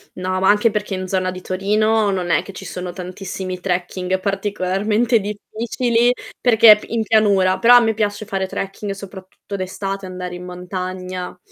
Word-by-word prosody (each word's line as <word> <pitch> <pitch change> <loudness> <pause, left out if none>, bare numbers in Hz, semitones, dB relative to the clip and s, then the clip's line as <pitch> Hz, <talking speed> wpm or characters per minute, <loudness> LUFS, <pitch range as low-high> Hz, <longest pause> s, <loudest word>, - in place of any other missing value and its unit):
No, 185 0 -2
ma 190 - +4
anche 210 +2 +4
perché 210 -1 -3
in 185 0 -4
zona 185 0 0
di 185 - -7
Torino 210 +4 +1
non 180 -2 -2
è - - +3
che - - -9
ci 190 - -10
sono 180 -1 -5
tantissimi 185 0 -6
trekking 180 0 -1
particolarmente 205 +4 0
difficili 230 +4 0 0.3
perché 225 -3 +8
p 210 - -11
in 230 -1 0
pianura. 200 -4 +3
Però 240 +1 +7
a - - +10
me 225 -2 +1
piace 210 0 -2
fare 195 -2 -2
trekking 195 +2 -5
soprattutto 195 0 -9
d'estate, 195 +1 -4
andare 180 -1 -6
in 180 - -8
montagna 180 0 -6
195 Hz, 165 wpm, -20 LUFS, 185-210 Hz, 0.3 s, a